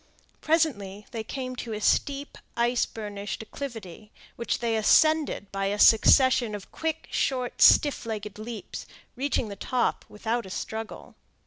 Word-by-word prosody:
Presently 210 - 0
they 225 -3 -4
came 255 +2 -5
to 230 -2 -5
a 210 - -4
steep, 280 +6 0 0.2
ice 240 +1 +2
burnished 205 -1 -6
acclivity, 220 -5 -8 0.2
which 235 - -2
they 230 -1 -1
ascended 305 -1 +3
by 195 0 -1
a 205 +1 -1
succession 235 +1 +5
of 200 - -10
quick, 320 0 -3
short, 255 -2 -1
stiff 290 -3 +6
legged 210 -2 -5
leaps, 225 0 -7 0.3
reaching 260 -3 -1
the 200 - -6
top 245 +5 -1
without 225 +1 -3
a - - -10
struggle. 220 +3 -6
225 Hz, 140 wpm, -26 LUFS, 210-260 Hz, 0.3 s, stiff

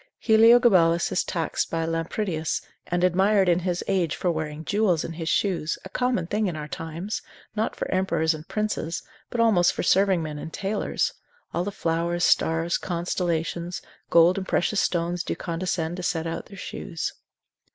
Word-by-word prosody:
Heliogabalus 220 -7 +5
is - - +1
taxed 165 -2 -2
by 165 -1 -1
Lampridius, 165 0 -2 0.2
and 175 0 0
admired 190 +2 +4
in 175 0 +4
his 180 -1 -2
age 180 -6 +1
for 180 - 0
wearing 155 -1 -4
jewels 200 -5 +2
in 165 - -5
his 165 0 -4
shoes, 180 -6 0
a - - -7
common 250 -6 0
thing 210 +4 0
in 175 - -3
our 150 -1 -5
times, 165 +7 -5 0.3
not 220 +1 -1
for - - -3
emperors 185 -4 +1
and 155 +1 -9
princes, 210 -6 -2 0.3
but 240 - -4
almost 195 -6 +4
for - - -3
serving 190 -3 +3
men 150 -1 -5
and 160 - -7
tailors; 200 +1 -1 0.4
all 175 - 0
the 205 - -3
flowers, 170 0 -1
stars, 165 0 +2
constellations, 175 -1 -2 0.3
gold 170 +3 +5
and 190 - -6
precious 200 +3 +1
stones 175 0 0
do - - -3
condescend 170 -1 -2
to - - -4
set 165 -2 -1
out 165 0 -4
their 200 - -12
shoes. 165 -2 -5
175 Hz, 170 wpm, -25 LUFS, 165-195 Hz, 0.4 s, Heliogabalus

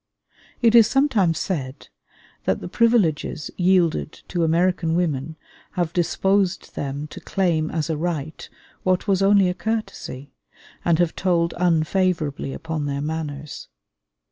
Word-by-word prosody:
It 230 -1 +5
is 230 -3 +8
sometimes 225 - +2
said 140 -7 -4 0.6
that 95 - +1
the - - -7
privileges 180 -9 +1
yielded 180 -4 +2 0.2
to 175 -2 0
American 165 0 +1
women 160 -3 -1 0.4
have 175 -3 -1
disposed 190 +2 +1
them 140 +1 -4
to - - -9
claim 165 -5 0
as 155 -3 -2
a 160 - -1
right 160 -2 -4 0.3
what 185 +2 0
was 195 -1 +2
only 195 -1 +5
a 180 - 0
courtesy, 185 - -4 0.5
and 170 -2 +3
have 175 -1 +1
told 170 -3 +1
unfavorably 170 -4 0
upon 160 0 -4
their 140 0 -2
manners. 150 -2 -5
170 Hz, 130 wpm, -23 LUFS, 155-185 Hz, 0.6 s, is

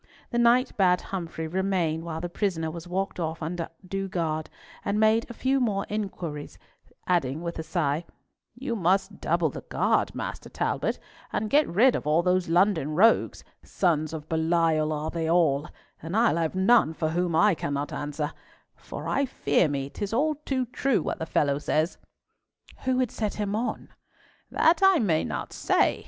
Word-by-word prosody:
The 240 - 0
knight 245 +2 +4
bade 180 -2 +4
Humfrey 165 -3 -4
remain 175 -3 0
while 160 -1 -5
the 175 - -2
prisoner 170 -3 -2
was 170 +1 -8
walked 190 +1 -2
off 160 -1 -3
under 165 +1 -3 0.2
due 195 +1 -3
guard, 160 -4 -2 0.3
and 200 +1 0
made 220 +2 +3
a - - -6
few 265 +3 +1
more 205 -6 0
inquiries, 180 -8 -5 0.5
adding, 160 -3 0
with 170 -1 -4
a - - 0
sigh, 160 -1 -1 0.5
"You 245 -1 -3
must 195 +1 0
double 165 -2 +1
the - - -7
guard, - - 0
Master - - -5
Talbot, - - -1 0.3
and 210 0 -2
get 295 +1 +4
rid 235 +8 +4
of - - -4
all 155 +3 +3
those 180 -1 +1
London 170 -4 +2
rogues—sons 175 -5 +1
of 155 -2 -7
Belial 160 -1 +1
are 155 +1 -2
they 165 -1 -2
all, 155 -4 +3 0.3
and 165 +6 -3
I'll 225 -7 +3
have 165 +1 -1
none 190 -4 +4
for 160 -1 -1
whom 175 0 0
I 210 +4 +5
cannot 145 -2 -3
answer—for 150 +1 -7
I 280 0 +1
fear 155 - +2
me 140 -1 -3
'tis 205 +1 -4
all 305 +6 +2
too 260 -2 0
true 250 - 0
what - - -3
the 160 - -4
fellow 140 -3 +1
says." 155 +3 0 0.9
"Who 260 -1 +2
would 255 -3 +1
set 215 -2 -3
him 205 -1 -2
on?" 230 +3 -3 0.6
"That 330 +4 +3
I 385 -2 +6
may 175 - +2
not - - -4
say. - - +2
175 Hz, 170 wpm, -26 LUFS, 160-210 Hz, 0.9 s, I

